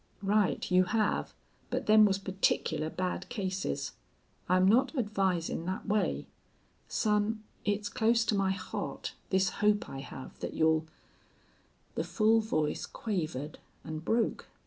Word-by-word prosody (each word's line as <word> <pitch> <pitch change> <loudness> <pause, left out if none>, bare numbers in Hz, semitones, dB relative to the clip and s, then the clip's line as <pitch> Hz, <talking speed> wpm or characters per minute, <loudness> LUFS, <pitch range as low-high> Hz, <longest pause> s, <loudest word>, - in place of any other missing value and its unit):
"Right, 200 -1 +1
you 185 0 +5
have. 215 +2 0 0.4
But - - -2
them 215 0 +7
was 195 -2 +2
particular 190 -5 0
bad 180 +2 -3
cases. 190 - -2 0.6
I'm 185 +1 +5
not 255 +9 +4
advisin' 190 -7 0
thet 185 - -3
way.... 210 0 +1 0.6
Son, 215 0 +1 0.2
it's 205 0 0
close 225 +2 +2
to 215 - +1
my 195 -1 +2
heart 190 -1 -4 0.2
this 190 0 +3
hope 210 0 +3
I 135 - -6
have 130 -1 -8
thet - - -5
you'll 160 0 +3 0.6
" - - -36
The - - -1
full 220 +1 +3
voice 155 -9 -1
quavered 155 - -3 0.2
and 155 0 -5
broke. 225 +5 0
195 Hz, 135 wpm, -31 LUFS, 180-215 Hz, 0.6 s, them